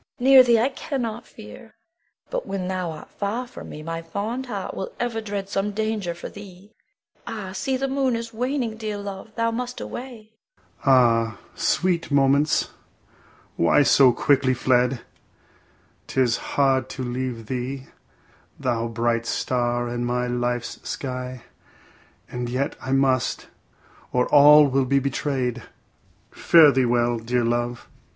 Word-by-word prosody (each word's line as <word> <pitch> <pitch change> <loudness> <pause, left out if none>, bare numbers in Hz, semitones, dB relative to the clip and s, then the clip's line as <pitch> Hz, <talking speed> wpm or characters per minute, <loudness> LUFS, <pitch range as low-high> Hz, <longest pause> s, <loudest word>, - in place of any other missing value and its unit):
Bianca. 265 +1 +3
Near 260 -1 +10
thee 235 -2 +4
I 245 +4 +2
cannot 240 -5 -4
fear; 105 - -13 0.6
but - - -3
when 190 -2 -3
thou 185 -2 -2
art 155 -1 -9
far 215 +5 -3
from 245 - -11
me, 155 - -8
my 165 +1 -4
fond 215 +10 -4
heart 245 - -5
will 485 - -5
ever 235 -2 -2
dread 200 -2 -4
some 195 +1 -1
danger 215 -4 -2
for 175 - -7
thee. 200 0 -13 0.6
Ah, 200 -4 -5
see 230 +8 -2
the 270 +1 -1
moon 265 -2 0
is 230 0 -5
waning; 245 -1 -2
dear 215 -2 -4
love, 200 0 -7
thou 230 0 0
must 250 +2 -4
away. 240 -4 -8 0.5
Adel. 135 - +3
Ah, 115 -3 +3 0.2
sweet 175 -1 0
moments, 140 +2 +3 0.9
why 85 +12 +4
so 135 -2 +6
quickly 130 0 +2
fled? 125 0 +1 1.1
'Tis 125 -3 +1
hard 135 -2 +1
to 130 - -5
leave 125 -2 -4
thee, 130 +3 -4 0.7
thou 120 -4 -1
bright 115 0 -1
star 120 -1 -1
in 120 0 -3
my 125 0 -1
life's 120 -1 -2
sky, 125 -2 -5 0.8
and 125 -1 -5
yet 130 +3 -2
I 130 - -5
must, 135 -2 +1 0.6
or 125 0 +2
all 150 +1 +8
may 135 +1 +2
be 135 +2 +1
betrayed. 130 -2 -1 0.7
Fare 160 -4 +6
thee 130 -1 +2
well, 120 -1 +1
dear 120 +2 -1
love. 120 +1 -2
140 Hz, 145 wpm, -23 LUFS, -, 1.1 s, Near